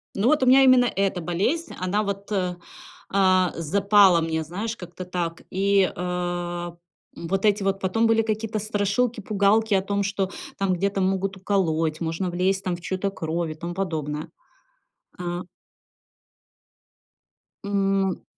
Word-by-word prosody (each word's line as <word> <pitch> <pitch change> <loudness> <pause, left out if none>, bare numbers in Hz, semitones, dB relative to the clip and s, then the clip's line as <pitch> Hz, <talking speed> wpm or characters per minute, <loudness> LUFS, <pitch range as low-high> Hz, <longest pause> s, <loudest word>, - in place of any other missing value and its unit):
Ну, 200 +4 +1
вот 300 +1 +3
у - - +4
меня 270 +1 +7
именно 255 -1 +6
эта 195 -5 0
болезнь, 205 - -1
она 190 +4 0
вот, 200 0 -5
а, 180 -3 -1 0.5
а, 185 -2 +3
запала 195 +2 +4
мне, 160 -1 -1
знаешь, 205 +8 -4
как-то 180 -1 -9
так 175 -2 -4
и, 195 0 +2
а, 175 -1 -3 0.4
м, 170 - -7
вот 195 +3 0
эти 205 0 +3
вот 195 0 0
потом 225 +5 +1
были 225 0 +4
какие-то 215 0 -2
страшилки, 215 +3 0
пугалки 210 +2 +2
о 190 - +4
том, 200 +1 -1
что 195 -1 -1 0.3
там 195 -1 +1
где-то 195 +2 -1
могут 190 +1 0
уколоть, 165 -5 0
можно 165 +3 -2
влезть 190 +2 0
там 180 -2 -1
в 175 - -11
чью-то 190 +2 -2
кровь 165 -2 -3
и - - -7
тому 170 +3 -6
подобное. 155 -5 -3 0.9
А 175 0 -4 2.2
М, 200 - -5
м. 195 -2 +1
190 Hz, 150 wpm, -24 LUFS, 175-200 Hz, 2.2 s, меня